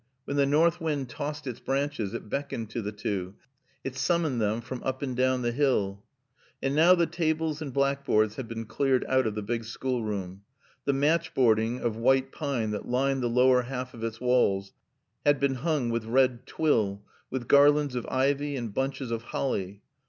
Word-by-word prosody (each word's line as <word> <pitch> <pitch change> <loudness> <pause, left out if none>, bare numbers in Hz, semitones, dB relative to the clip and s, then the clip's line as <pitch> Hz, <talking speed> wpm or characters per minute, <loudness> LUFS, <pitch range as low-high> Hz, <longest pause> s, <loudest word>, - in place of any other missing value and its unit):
When 140 - -3
the 140 -1 +3
north 165 +4 +3
wind 145 -5 -2
tossed 150 +3 -5
its 125 -2 -5
branches 135 -6 -2
it 120 - -6
beckoned 120 -3 -4
to 115 - -3
the 105 0 -4
two, 100 -2 -4 0.5
it 135 -1 -5
summoned 150 -2 +1
them 105 +2 +1
from 125 +1 -7
up 130 +1 -3
and 130 -3 -2
down 130 0 +1
the 120 - +1
hill. 105 -7 0 0.6
And 135 +1 -1
now 170 +4 +7
the 170 -1 +3
tables 160 -2 -1
and 145 -3 -4
blackboards 140 -6 +1
had 130 -3 -5
been 115 0 -5
cleared 130 +2 +1
out 130 -2 +2
of 105 - -3
the 105 - -3
big 115 +2 -2
schoolroom. 105 -6 -3 0.4
The 140 - +2
matchboarding 130 -7 +2
of 115 -2 -1
white 130 +3 +2
pine 130 -8 -2
that 105 - -4
lined 135 +2 +1
the 120 - +1
lower 125 +1 +4
half 125 0 -5
of 115 - -9
its 115 0 -3
walls 100 -6 +2 0.5
had 145 -1 +3
been 140 -1 +2
hung 135 -2 -1
with 115 -1 -2
red 125 +1 +2
twill, 105 -10 +1 0.3
with 130 -3 -4
garlands 145 0 +5
of 125 -2 -3
ivy 140 +2 +1
and 120 -5 -4
bunches 135 -1 -2
of 115 -1 -2
holly. 100 -6 -3
130 Hz, 185 wpm, -28 LUFS, 115-140 Hz, 0.6 s, now